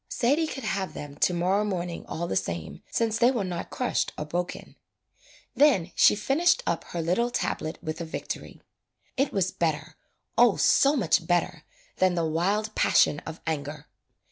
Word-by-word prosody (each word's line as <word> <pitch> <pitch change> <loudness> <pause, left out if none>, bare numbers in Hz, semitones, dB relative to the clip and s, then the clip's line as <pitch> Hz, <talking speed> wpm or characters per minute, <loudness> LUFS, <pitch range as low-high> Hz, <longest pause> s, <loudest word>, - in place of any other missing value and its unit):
Sadie 290 +7 +1
could 270 - -6
have 190 -1 -2
them 145 -1 -7
to 180 - +3
morrow 185 +4 +1
morning 180 -4 -4
all 170 +1 -4
the - - -2
same 85 -4 -3
since 225 -1 0
they 240 +1 +5
were 240 -6 -1
not 180 -2 -4
crushed 250 - -1
or 150 - -4
broken. 175 +3 -4 0.8
Then 225 - +3
she - - +5
finished 330 +11 +2
up 170 - -1
her 170 -1 -4
little 210 +9 +1
tablet 160 -8 -3
with 160 0 -4
a - - -3
victory. 160 - -7 0.5
It 275 +1 +1
was 185 -2 0
better, 155 -2 -2 0.4
oh - - +6
so 280 +2 +4
much 170 - +1
better 175 -2 0 0.3
than 185 -1 +3
the 170 -1 0
wild 200 +7 0
passion 150 - +3
of 160 - -7
anger. 150 -1 -4
180 Hz, 170 wpm, -26 LUFS, 160-225 Hz, 0.8 s, oh